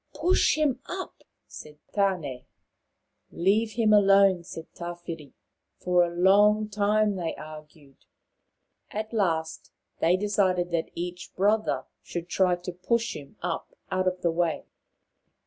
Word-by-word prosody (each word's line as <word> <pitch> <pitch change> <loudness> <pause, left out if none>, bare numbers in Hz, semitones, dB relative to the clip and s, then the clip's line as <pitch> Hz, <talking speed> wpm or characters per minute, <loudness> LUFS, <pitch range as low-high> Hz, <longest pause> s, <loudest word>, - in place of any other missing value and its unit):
" - - -46
Push 365 +2 +3
him 295 -5 +1
up," 375 0 -7 0.2
said 150 -1 -11 0.2
Tane. 180 -11 -1 0.5
" - - -50
Leave 215 +3 +3
him 220 -1 +3
alone," 195 -3 +5
said 165 -1 -8
Tawhiri. 170 -4 -7 0.4
For 180 -1 +3
a 175 - 0
long 205 +4 +4
time 210 0 +1
they 170 -3 -3
argued. 155 -2 -12 0.9
At 215 +2 -5
last 165 -7 -1 0.3
they 175 +3 +3
decided 185 -3 +1
that 165 -1 -1
each 175 +1 -6
brother 210 +3 +1 0.2
should 175 0 -6
try 180 -1 +3
to 175 +1 -7
push 230 +6 -1
him 140 -2 -11
up 175 -2 -4 0.2
out 185 0 0
of 180 0 -1
the 170 - +3
way. 170 0 -1
180 Hz, 135 wpm, -27 LUFS, 170-210 Hz, 0.9 s, alone